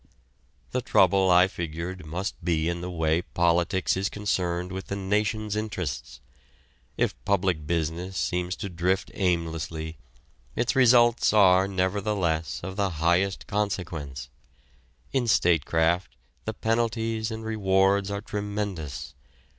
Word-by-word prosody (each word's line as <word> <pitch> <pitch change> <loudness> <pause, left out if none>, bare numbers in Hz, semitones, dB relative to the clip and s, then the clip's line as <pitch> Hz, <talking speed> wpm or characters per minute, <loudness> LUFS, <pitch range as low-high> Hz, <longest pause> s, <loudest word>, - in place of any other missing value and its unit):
The 125 - 0
trouble, 95 -3 +4
I 90 +1 +6
figured, 85 0 -5
must 90 +3 -4
be 80 -2 +1
in 85 0 -2
the 90 - -4
way 80 -1 +1
politics 85 +1 +1
is 95 +1 -1
concerned 90 -3 -2
with 95 0 -6
the 100 - -3
nation's 105 +2 -1
interests. 90 -11 -4 0.8
If - - +1
public 90 -3 0
business 85 +3 -2
seems 90 +1 -1
to 100 - -5
drift 90 +2 -1
aimlessly, 80 -4 -2 0.6
its 125 +3 0
results 120 -3 +5
are, 95 -2 +6
nevertheless, 95 -3 -1
of 95 +2 -6
the 100 -1 +1
highest 90 +4 +1
consequence. 85 -10 -3 0.8
In 125 -3 +1
statecraft 85 -2 +2 0.3
the 110 - -2
penalties 115 0 0
and 110 0 -6
rewards 100 -2 +2
are 100 0 -3
tremendous. 100 -8 -4
95 Hz, 120 wpm, -26 LUFS, 85-105 Hz, 0.8 s, I